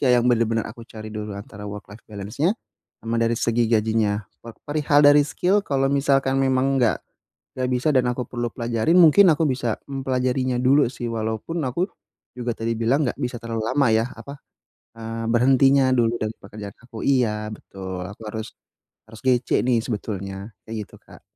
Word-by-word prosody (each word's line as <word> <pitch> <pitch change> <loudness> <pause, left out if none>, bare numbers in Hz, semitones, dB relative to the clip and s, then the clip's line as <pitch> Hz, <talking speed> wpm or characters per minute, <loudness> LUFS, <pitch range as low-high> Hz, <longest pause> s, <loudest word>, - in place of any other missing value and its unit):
kayak 125 -3 +4
yang - - 0
bener-bener 115 -1 +1
aku 115 +2 -10
cari 110 -1 -9
dulu, 105 -1 -5
antara 100 0 -9
work-life 105 +1 -10
balance-nya 110 - -1 0.5
sama 115 +1 -2
dari 115 0 +2
segi 115 0 +1
gajinya, 110 -2 +1 0.2
pe 115 - -11 0.2
perihal 145 -1 +2
dari 145 0 +7
skill 190 +6 +1
kalau 135 -1 +1
misalkan 135 -1 +2
memang 135 0 +2
enggak 115 - +2 0.6
enggak 130 -1 -1
bisa 125 +5 0
dan 125 -1 +3
aku 125 +1 -2
perlu 120 -1 -3
pelajarin. 120 +7 +1
Mungkin 180 +4 +7
aku 155 +2 +1
bisa 125 -4 -1
mempelajarinya 130 -1 -1
dulu 140 +2 +5
sih. 120 - -7
Walaupun 110 +9 -3
aku 170 +9 0 0.5
juga 120 -1 -2
tadi 115 +1 -1
bilang 130 +6 +2
nggak - - -4
bisa 125 -2 -2
terlalu 115 -1 -3
lama 140 0 +2
yah, 110 +2 +2
apa, 140 0 -10 0.6
eee, 115 0 -5
berhentinya 135 +2 +4
dulu 120 -2 +2
dari 110 0 -2
pekerjaan 100 0 -10
aku. 120 -3 -9
Iya 110 -6 +1
betul, 95 -3 -7
aku 105 - -13
harus 110 +1 -5 0.6
harus 110 0 -12
GC 125 -1 +2 0.2
nih 125 -2 +3
sebetulnya, 100 -2 -5 0.2
kayak 115 - -5
gitu, - - -16
Kak. - - -16
120 Hz, 170 wpm, -23 LUFS, 110-135 Hz, 0.6 s, dari